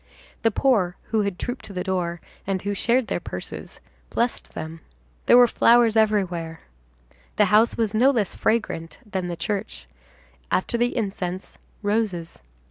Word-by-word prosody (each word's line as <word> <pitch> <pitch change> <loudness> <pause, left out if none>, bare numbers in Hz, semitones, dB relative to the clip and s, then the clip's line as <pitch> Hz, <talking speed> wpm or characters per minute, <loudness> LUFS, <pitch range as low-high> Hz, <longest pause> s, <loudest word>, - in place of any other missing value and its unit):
The 225 - +4
poor, 210 -7 +2 0.2
who 220 -1 +3
had 200 -3 -2
trooped 245 +1 -4
to 200 - -10
the 180 -1 -2
door, 175 -3 -2 0.3
and 190 -2 -1
who 205 0 -1
shared 240 +5 +2
their - - -2
purses, - - -8 0.3
blessed 240 +1 -2
them. 160 +1 -6 0.5
There - - +8
were 245 - +9
flowers 235 -1 +4
everywhere. 180 -7 +1 0.7
The - - +5
house 220 +2 +5
was 225 -2 0
no 240 +5 +5
less 225 -8 +1
fragrant 165 -8 -1
than 190 -4 -3
the 175 - -3
church; 205 +5 -4 0.6
after - - 0
the 240 +2 +1
incense, 190 -4 -4 0.2
roses. 205 - -1
205 Hz, 150 wpm, -24 LUFS, 180-230 Hz, 0.7 s, were